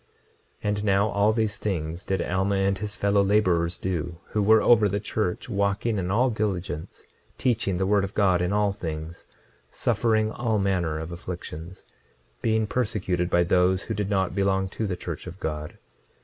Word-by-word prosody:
26:38 105 - 0
And 105 0 -1
now 100 +1 +3
all 100 +1 +3
these 110 -2 0
things 85 -3 -3
did 95 -2 0
Alma 95 +2 0
and 95 0 +2
his 105 0 -5
fellow 100 0 +2
laborers 90 -4 +2
do 85 -2 -3
who 105 - 0
were 110 +2 +5
over 110 -4 +5
the 100 +2 -1
church, 105 -3 -2
walking 100 0 0
in 90 -1 -2
all 120 +6 +3
diligence, 95 -6 -3 0.3
teaching 110 -7 0
the 95 - 0
word 100 0 +3
of 100 +1 -5
God 95 -4 +3
in 90 +1 0
all 105 -1 +2
things, 80 -2 -6 0.4
suffering 110 -2 +1
all 115 -2 0
manner 90 -6 0
of 80 +2 -5
afflictions, 85 0 -7 0.6
being 110 -1 +2
persecuted 95 -6 -1
by 85 - +3
all - - -3
those 90 +2 +3
who - - -3
did 105 -1 -2
not 95 -3 +1
belong 95 -1 +1
to 110 +3 -3
the 90 -2 -3
church 85 -1 -6
of 90 +2 -9
God. 75 -1 -4
95 Hz, 180 wpm, -26 LUFS, 90-105 Hz, 0.6 s, were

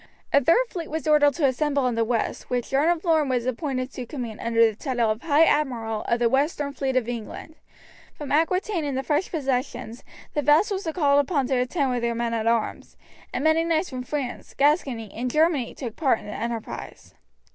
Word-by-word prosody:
A 280 - +5
third 335 - +4
fleet 340 -7 -6
was 320 0 -4
ordered 290 -2 +4
to 320 - +1
assemble 280 +1 +1
in 250 - +1
the 230 0 +1
west, 230 0 -2
which 245 -2 -2
John 280 +4 +3
of 345 0 0
Lorne 315 -4 +3
was 245 -2 0
appointed 255 0 -2
to 250 -2 -6
command 235 -6 -6
under 230 0 +4
the 220 -2 0
title 240 -2 0
of 215 - -4
High 305 0 +4
Admiral 230 -9 0
of 235 - +2
the 240 0 +2
Western 280 +2 0
Fleet 265 -1 -2
of 250 -3 +1
England. 240 +6 -6 0.6
From 295 - -7
Aquitaine 345 +4 +1
and 280 -3 -2
the 265 - -2
French 295 +6 0
possessions 255 -5 -3 0.3
the 295 - 0
vassals 335 +6 +2
were - - 0
called 285 -4 +3
upon 285 -1 +1
to 265 - +2
attend 255 +2 0
with 245 -1 -1
their 235 0 -1
men 235 0 -1
at 225 -1 -1
arms, 230 -1 -1 0.3
and - - -3
many 315 +1 +3
knights 330 0 0
from 255 -1 -4
France, 260 -1 -5
Gascony, 275 - +1
and 250 +2 -3
Germany 305 -3 +1
took 240 -5 -6
part 270 -8 +2
in - - -12
the 205 - -7
enterprise. 230 +1 -6
270 Hz, 210 wpm, -24 LUFS, 235-305 Hz, 0.6 s, A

